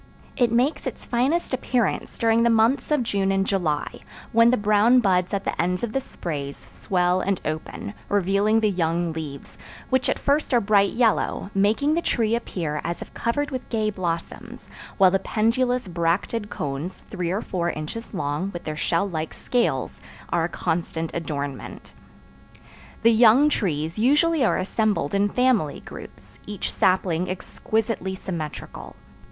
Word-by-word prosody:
It 245 Hz, -3 st, +2 dB
makes 250 Hz, +6 st, +1 dB
its -, -, -6 dB
finest 265 Hz, +7 st, 0 dB
appearance 245 Hz, -4 st, -1 dB
during 230 Hz, 0 st, +3 dB
the 235 Hz, -, +4 dB
months 230 Hz, +4 st, +3 dB
of 300 Hz, -4 st, +2 dB
June 195 Hz, -3 st, 0 dB
and 195 Hz, 0 st, +1 dB
July, 165 Hz, -7 st, -1 dB, 0.3 s
when 230 Hz, +1 st, +6 dB
the 250 Hz, -, +3 dB
brown 215 Hz, +4 st, +4 dB
buds 185 Hz, -5 st, +2 dB
at 200 Hz, -1 st, -1 dB
the -, -, -1 dB
ends 180 Hz, +3 st, -1 dB
of 230 Hz, -2 st, -2 dB
the 270 Hz, -, 0 dB
sprays 145 Hz, -, -5 dB
swell 180 Hz, 0 st, -1 dB
and 195 Hz, -1 st, 0 dB
open, 155 Hz, +6 st, -4 dB, 0.2 s
revealing 200 Hz, +2 st, +2 dB
the 215 Hz, -1 st, +2 dB
young 170 Hz, -2 st, 0 dB
leaves, 150 Hz, -3 st, -8 dB, 0.3 s
which 260 Hz, 0 st, +2 dB
at -, -, +1 dB
first 285 Hz, -2 st, +1 dB
are -, -, +6 dB
bright 200 Hz, -2 st, +3 dB
yellow, 225 Hz, -3 st, +1 dB
making 215 Hz, +10 st, +2 dB
the 340 Hz, -, +1 dB
tree 225 Hz, -8 st, 0 dB
appear 165 Hz, -10 st, -2 dB
as 170 Hz, 0 st, -3 dB
if -, -, -19 dB
covered 290 Hz, +6 st, -1 dB
with 255 Hz, -1 st, -5 dB
gay 215 Hz, -2 st, 0 dB
blossoms; 170 Hz, -4 st, -5 dB, 0.3 s
while 190 Hz, -2 st, +6 dB
the 195 Hz, -, +2 dB
pendulous 240 Hz, +3 st, 0 dB
bracted 180 Hz, +5 st, -1 dB
cones, 145 Hz, +5 st, -5 dB
three 180 Hz, -4 st, -2 dB
or 195 Hz, +5 st, -1 dB
four 175 Hz, -2 st, -2 dB
inches 165 Hz, +9 st, -6 dB
long, 155 Hz, 0 st, -2 dB
with 175 Hz, -, -6 dB
their 155 Hz, -, -4 dB
shell 165 Hz, +5 st, 0 dB
like 160 Hz, -4 st, -4 dB
scales, 245 Hz, -1 st, -1 dB, 0.3 s
are 170 Hz, -1 st, +1 dB
a -, -, -3 dB
constant 165 Hz, -1 st, -2 dB
adornment. 145 Hz, -5 st, -5 dB, 1.1 s
The 230 Hz, 0 st, +6 dB
young 240 Hz, +6 st, +6 dB
trees 165 Hz, -, -1 dB
usually 295 Hz, +5 st, +3 dB
are 235 Hz, -, +2 dB
assembled 205 Hz, -5 st, 0 dB
in 200 Hz, +1 st, +2 dB
family 245 Hz, -, +1 dB
groups, -, -, -12 dB
each 205 Hz, -2 st, -4 dB
sapling 185 Hz, -2 st, +1 dB
exquisitely 195 Hz, +1 st, -2 dB
symmetrical. 170 Hz, -6 st, -6 dB
200 Hz, 160 wpm, -24 LUFS, 170-230 Hz, 1.1 s, when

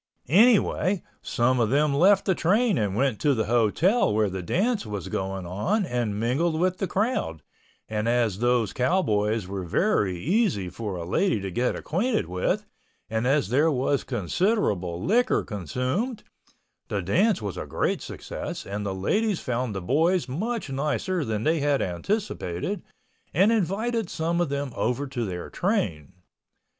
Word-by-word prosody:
Anyway, 200 Hz, -, +4 dB, 0.2 s
some 125 Hz, +2 st, +1 dB
of 115 Hz, -3 st, +2 dB
them 145 Hz, +2 st, +2 dB
left 190 Hz, +7 st, +4 dB
the 190 Hz, -, +3 dB
train 205 Hz, +6 st, +2 dB
and 100 Hz, -3 st, -1 dB
went 125 Hz, -2 st, +1 dB
to 145 Hz, -2 st, +2 dB
the 110 Hz, -2 st, 0 dB
hotel 120 Hz, -, +2 dB
where 105 Hz, -2 st, +1 dB
the 95 Hz, 0 st, -4 dB
dance 205 Hz, -, 0 dB
was 105 Hz, -6 st, -5 dB
going 95 Hz, -1 st, -3 dB
on 170 Hz, -, 0 dB
and 120 Hz, -6 st, -2 dB
mingled 155 Hz, +8 st, +1 dB
with 185 Hz, +1 st, +1 dB
the 195 Hz, -, -1 dB
crowd 195 Hz, -, -1 dB, 0.4 s
and 110 Hz, +1 st, -1 dB
as 115 Hz, -5 st, +1 dB
those 120 Hz, -3 st, +1 dB
cowboys 110 Hz, -, +1 dB
were 95 Hz, 0 st, -4 dB
very 95 Hz, -, +1 dB
easy 165 Hz, -, +1 dB
for 105 Hz, 0 st, -5 dB
a 85 Hz, -2 st, -5 dB
lady 175 Hz, -, +1 dB
to 95 Hz, -1 st, -5 dB
get 125 Hz, +7 st, 0 dB
acquainted 210 Hz, -, 0 dB
with 90 Hz, +2 st, -1 dB, 0.5 s
and 110 Hz, +2 st, 0 dB
as 140 Hz, -5 st, +2 dB
there 145 Hz, +7 st, +3 dB
was 135 Hz, -1 st, 0 dB
considerable 100 Hz, -, 0 dB
liquor 245 Hz, +4 st, +2 dB
consumed, 130 Hz, -, -3 dB, 0.6 s
the 100 Hz, -2 st, -2 dB
dance 190 Hz, -, +2 dB
was 100 Hz, -4 st, -4 dB
a -, -, -5 dB
great -, -, -1 dB
success -, -, -6 dB
and 100 Hz, +1 st, -4 dB
the 100 Hz, -2 st, -3 dB
ladies 205 Hz, -, 0 dB
found 125 Hz, -3 st, -2 dB
the 95 Hz, -, -3 dB
boys 160 Hz, -, +2 dB
much 215 Hz, -, -3 dB
nicer 150 Hz, +6 st, -1 dB
than 110 Hz, -3 st, -2 dB
they 160 Hz, +3 st, +2 dB
had 145 Hz, -1 st, +2 dB
anticipated 95 Hz, -, -2 dB, 0.5 s
and 195 Hz, +5 st, +5 dB
invited 220 Hz, +1 st, 0 dB
some 165 Hz, +1 st, -1 dB
of 175 Hz, -, 0 dB
them 140 Hz, -1 st, -2 dB
over 125 Hz, +5 st, -1 dB
to 130 Hz, -4 st, -3 dB
their 90 Hz, -2 st, -5 dB
train. 100 Hz, -, -1 dB
130 Hz, 160 wpm, -26 LUFS, -, 0.6 s, and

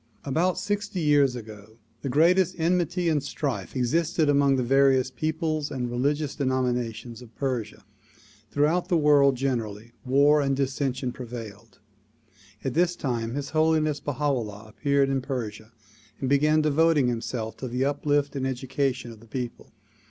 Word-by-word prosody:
About 165 Hz, +6 st, +1 dB
sixty 205 Hz, -2 st, -2 dB
years 145 Hz, -5 st, +3 dB
ago 110 Hz, -2 st, -10 dB, 0.2 s
the 140 Hz, -, -3 dB
greatest 175 Hz, +6 st, +3 dB
enmity 175 Hz, +1 st, +1 dB
and 155 Hz, -3 st, +2 dB
strife 140 Hz, -1 st, -4 dB
existed 155 Hz, +5 st, +1 dB
among 140 Hz, -1 st, +4 dB
the 130 Hz, -, 0 dB
various 135 Hz, 0 st, +3 dB
peoples 155 Hz, +2 st, -2 dB
and 125 Hz, -2 st, -3 dB
religious 140 Hz, +4 st, 0 dB
denominations 125 Hz, -3 st, -2 dB
of 115 Hz, -2 st, -15 dB
Persia. 125 Hz, -6 st, -3 dB, 0.6 s
Throughout 160 Hz, +5 st, +1 dB
the 175 Hz, -, +3 dB
world 145 Hz, -3 st, +5 dB
generally, 115 Hz, -4 st, -3 dB
war 140 Hz, +3 st, +4 dB
and 135 Hz, -1 st, +1 dB
dissension 135 Hz, -1 st, -1 dB
prevailed. 115 Hz, -4 st, -9 dB, 0.9 s
At 135 Hz, -, -2 dB
this 175 Hz, +2 st, +2 dB
time 120 Hz, -5 st, -3 dB
His 140 Hz, 0 st, -4 dB
Holiness 155 Hz, -1 st, +2 dB
Baiia 145 Hz, -1 st, -5 dB
'Ullah 110 Hz, -8 st, -1 dB
appeared 140 Hz, +4 st, +1 dB
in 135 Hz, -1 st, 0 dB
Persia 115 Hz, -5 st, -5 dB, 0.5 s
and 135 Hz, -, -2 dB
began 150 Hz, +3 st, +3 dB
devoting 155 Hz, -2 st, +3 dB
himself 115 Hz, -2 st, -3 dB
to 130 Hz, -, -5 dB
the 125 Hz, +2 st, -1 dB
uplift 145 Hz, 0 st, 0 dB
and 135 Hz, -1 st, -1 dB
education 130 Hz, -1 st, -2 dB
of 115 Hz, -, -13 dB
the 115 Hz, -, -17 dB
people. 120 Hz, +1 st, -6 dB
135 Hz, 145 wpm, -26 LUFS, 125-150 Hz, 0.9 s, world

